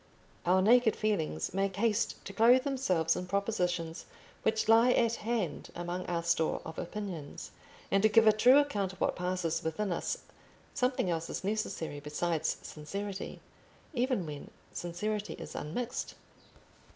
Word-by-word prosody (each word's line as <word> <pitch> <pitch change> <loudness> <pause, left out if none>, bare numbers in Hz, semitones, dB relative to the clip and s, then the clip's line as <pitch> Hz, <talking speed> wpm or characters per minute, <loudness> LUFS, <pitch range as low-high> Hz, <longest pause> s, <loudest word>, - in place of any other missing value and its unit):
Our 185 +1 +4
naked 235 +1 +5
feelings 165 - -1
make 195 0 0
haste 225 +1 +1
to 200 - -7
clothe 240 +5 +6
themselves 185 - +1
in 180 - -4
propositions 180 -5 -1 0.3
which 220 0 +1
lie 230 +3 +6
at 235 -1 +2
hand 215 -9 -2
among 175 +1 -4
our 170 -1 -1
store 170 -1 +1
of 160 0 -6
opinions, 175 -5 -6 0.4
and 195 - +4
to 220 - +5
give 225 +1 +6
a 215 - +8
true 245 +5 +6
account 205 -10 +1
of 190 - -15
what - - +1
passes 180 -2 -1
within 180 +5 -1
us 170 - -1 0.6
something 250 -8 +1
else 165 0 -2
is - - -4
necessary 190 -7 -2
besides 150 +2 -1
sincerity, 195 +6 -6 0.5
even 250 - 0
when 150 -2 -7 0.2
sincerity 205 +5 -3
is - - -8
unmixed. 240 +11 -4
195 Hz, 145 wpm, -31 LUFS, 170-220 Hz, 0.6 s, a